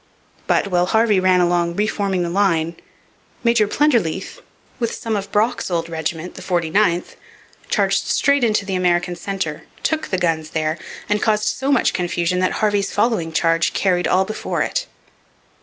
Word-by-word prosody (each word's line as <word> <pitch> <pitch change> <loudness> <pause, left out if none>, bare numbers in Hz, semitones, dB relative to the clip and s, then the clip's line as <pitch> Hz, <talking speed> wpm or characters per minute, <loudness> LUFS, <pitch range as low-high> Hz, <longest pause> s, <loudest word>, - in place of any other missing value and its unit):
But, 200 - +2
while 180 -1 +2
Harvey 220 -1 +3
ran 185 -1 +3
along 175 -1 +1
re 210 - +1
forming 195 -4 -1
the 170 - -2
line, 170 -4 +1 0.7
Major 235 -3 +3
Plenderleath, 235 - 0 0.4
with 235 -2 -1
some 225 -1 -3
of 200 -1 -4
Brock's 220 +2 0
old 170 -2 -2
regiment, 160 +1 -4
the - - -10
49th, 175 +1 0 0.5
charged - - +1
straight 280 -2 +2
into 215 -3 +2
the 195 - -3
American 175 -1 +1
centre, 175 -4 -4 0.2
took 315 -1 0
the 190 - -1
guns 165 -3 -1
there, 155 +1 -1 0.3
and 210 0 0
caused 215 -1 +2
so 270 +1 -1
much 275 - +3
confusion 175 0 -1
that 185 - +1
Harvey's 205 -2 0
following 205 -7 0
charge 165 +1 +1
carried 180 -2 +1
all 190 +1 +3
before 215 +2 -2
it. - - -2
185 Hz, 160 wpm, -20 LUFS, 170-215 Hz, 0.7 s, Harvey